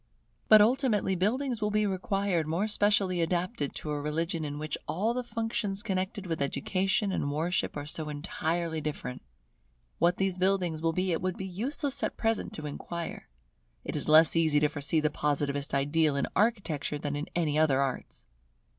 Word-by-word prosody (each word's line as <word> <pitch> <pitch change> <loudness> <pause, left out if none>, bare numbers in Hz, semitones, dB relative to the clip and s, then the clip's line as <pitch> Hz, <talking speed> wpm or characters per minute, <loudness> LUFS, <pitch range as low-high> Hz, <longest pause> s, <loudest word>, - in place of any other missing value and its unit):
But 215 -1 +9
ultimately 225 -5 +2
buildings 235 +6 0
will 210 - +1
be 210 0 +2
required 195 -3 0
more 170 +7 0
specially 205 -4 +2
adapted 170 - -1
to 150 - -4
a 145 -1 -2
religion 160 +2 -2
in 145 -1 -4
which 155 0 -3
all 215 +7 0
the 250 +1 -2
functions 225 -3 -2
connected 190 +1 -2
with 165 -4 -3
education 195 +8 0
and 145 -6 -1
worship 165 +2 -1
are 145 - -4
so 155 0 -4
entirely 160 +2 -2
different. 140 -4 -5 0.8
What 175 +2 +3
these 190 -2 0
buildings 185 -4 +1
will 165 0 +2
be 185 +2 0
it 165 - 0
would 185 0 -2
be 190 - -4
useless 270 - -1
at - - -2
present 225 -1 0
to 155 - -6
inquire. 170 +3 -6 0.6
It - - -4
is - - -3
less 155 +1 +6
easy 160 -3 +4
to 150 - +3
foresee 150 +2 0
the 150 0 +1
Positivist 145 -1 -1
ideal 145 +2 +2
in 140 - +1
Architecture 195 -9 0
than 145 0 -3
in 145 +2 -3
any 155 -3 +1
other 145 -4 +3
arts. 135 -2 -3
170 Hz, 175 wpm, -29 LUFS, 150-200 Hz, 0.8 s, But